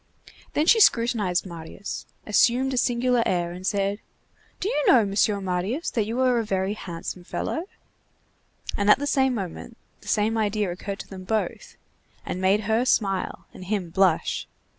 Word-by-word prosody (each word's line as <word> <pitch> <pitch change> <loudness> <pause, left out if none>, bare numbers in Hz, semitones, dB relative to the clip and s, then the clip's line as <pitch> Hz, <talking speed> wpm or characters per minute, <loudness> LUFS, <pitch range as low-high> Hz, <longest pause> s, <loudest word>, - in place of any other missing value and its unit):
Then 300 - +2
she 450 +6 +6
scrutinized 230 - +3
Marius, 170 +2 -7 0.2
assumed 250 +5 +3
a - - -1
singular 245 0 +2
air 175 -4 0
and 180 +2 -6
said:— 200 0 0 0.6
"Do 380 - -2
you 295 -9 0
know, 235 -5 +6
Mr. 200 +1 +1
Marius, 190 - -2
that 215 -3 0
you 230 +3 -2
are 250 -2 +3
a - - 0
very 195 -1 -1
handsome 175 -2 -7
fellow?" 320 - -3 1.1
And 205 0 +1
at - - +8
the 285 - -3
same 265 -3 +2
moment 200 +3 -6 0.2
the - - -17
same 220 +1 +1
idea 210 -3 0
occurred 195 +3 -5
to - - -12
them 190 -1 -9
both, 215 +3 -3 0.5
and 185 - -4
made 195 +3 +3
her 220 +3 +1
smile 195 -6 0
and 185 - -10
him 190 -4 -2
blush. 190 +1 +1
210 Hz, 165 wpm, -25 LUFS, 190-240 Hz, 1.1 s, at